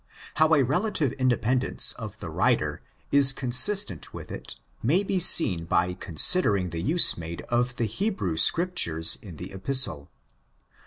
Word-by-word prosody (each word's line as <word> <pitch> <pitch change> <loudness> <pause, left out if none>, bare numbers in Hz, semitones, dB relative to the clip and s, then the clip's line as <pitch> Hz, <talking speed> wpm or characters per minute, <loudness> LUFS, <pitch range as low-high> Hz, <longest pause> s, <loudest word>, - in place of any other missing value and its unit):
How 160 +1 +3
a 140 - +1
relative 150 - -2
independence 125 0 +1
of - - -11
the - - -9
writer - - -2 0.3
is 140 -1 +7
consistent 135 +11 +2
with - - -11
it - - -10 0.3
may 165 - 0
be 195 -1 -3
seen 95 - +3
by 90 +2 -1
considering 95 - 0
the 80 0 -5
use 160 - +2
made 85 0 -8
of 120 +1 -2
the 120 - -3
Hebrew 110 - -4
Scriptures 85 - 0
in 95 -6 -12
the 90 +5 -10
Epistle. 95 - 0
125 Hz, 145 wpm, -24 LUFS, -, 0.3 s, is